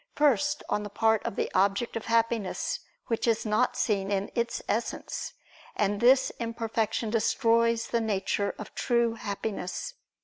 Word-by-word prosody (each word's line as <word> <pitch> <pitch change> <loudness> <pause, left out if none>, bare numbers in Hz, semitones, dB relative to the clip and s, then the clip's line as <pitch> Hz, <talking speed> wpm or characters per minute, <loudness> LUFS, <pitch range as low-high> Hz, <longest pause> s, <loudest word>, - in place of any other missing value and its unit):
First, 290 0 +2
on 210 - 0
the 205 - -6
part 220 +1 +2
of - - -4
the - - -1
object 200 +4 +1
of 225 - -4
Happiness, 230 -3 0 0.3
which 230 0 -1
is 225 -1 +2
not 215 +4 +1
seen 195 -3 0
in 200 0 -1
Its 235 -1 -1
Essence: 230 +3 -3 0.4
and 205 0 +1
this 260 +2 +5
imperfection 225 -1 -1
destroys 230 0 +2
the 235 - +1
nature 200 -1 -1
of - - -9
true 235 -2 +1
Happiness. 205 - -4
225 Hz, 145 wpm, -28 LUFS, 205-235 Hz, 0.4 s, this